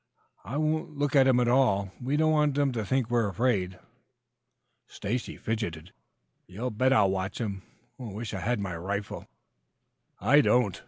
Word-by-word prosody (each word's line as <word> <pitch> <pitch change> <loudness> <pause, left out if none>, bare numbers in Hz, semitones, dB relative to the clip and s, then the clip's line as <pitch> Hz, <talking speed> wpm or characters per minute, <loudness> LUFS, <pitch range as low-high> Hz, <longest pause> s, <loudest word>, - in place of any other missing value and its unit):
I 135 - -5
won't 155 -1 -1
look 145 0 0
at 135 -1 +6
them 125 -2 +4
at 120 - +2
all. 100 -7 +2
We 135 +4 -1
don't 155 0 +3
want 150 -2 +2
them 145 -1 +2
to 115 -3 -3
think 130 +3 0
we're 120 -2 +1
afraid." 95 -4 0 1.1
Stacy 115 +5 -4
fidgeted. 95 -7 -4 0.5
"You 115 +8 -4
bet 130 +5 +1
I'll 100 -7 +4
watch 95 +1 -3
'em. 100 -5 -3 0.4
Wish 110 -2 -6
I 95 - -3
had 120 +4 -1
my 95 -4 -4
rifle." 100 +4 -5 0.9
"I 135 +9 +5
don't." 120 -8 +2
120 Hz, 160 wpm, -28 LUFS, 100-130 Hz, 1.1 s, at